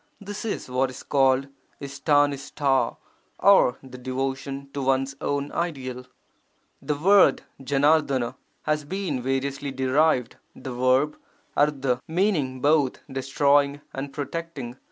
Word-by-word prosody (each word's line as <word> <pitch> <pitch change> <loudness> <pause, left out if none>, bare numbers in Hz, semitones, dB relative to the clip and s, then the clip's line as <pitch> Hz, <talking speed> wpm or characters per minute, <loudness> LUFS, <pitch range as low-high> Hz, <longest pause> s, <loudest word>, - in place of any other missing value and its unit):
This 205 +1 -7
is 220 - -3
what 130 +1 0
is 130 - -10
called 135 -1 +2 0.3
Istanista, 140 -2 +1 0.4
or 195 -10 +5
the 130 -1 -11
devotion 135 +2 -4
to 140 - -3
one's 135 +1 +1
own 145 0 -2
ideal. 130 -7 -4 0.7
The 150 - -1
word 195 +6 +5 0.2
5RF£*I 140 -3 +2 0.3
has 150 -1 0
been 170 -5 -3
variously 135 +2 -2
derived, 135 0 +1 0.2
the 130 - -7
verb 130 +4 +2 0.4
3^ 135 -4 +1
meaning 160 -8 0
both 145 -2 +2
'destroying' 140 +2 +2
and 135 +1 -5
'protecting'. 145 -4 -5
140 Hz, 115 wpm, -25 LUFS, 130-150 Hz, 0.7 s, or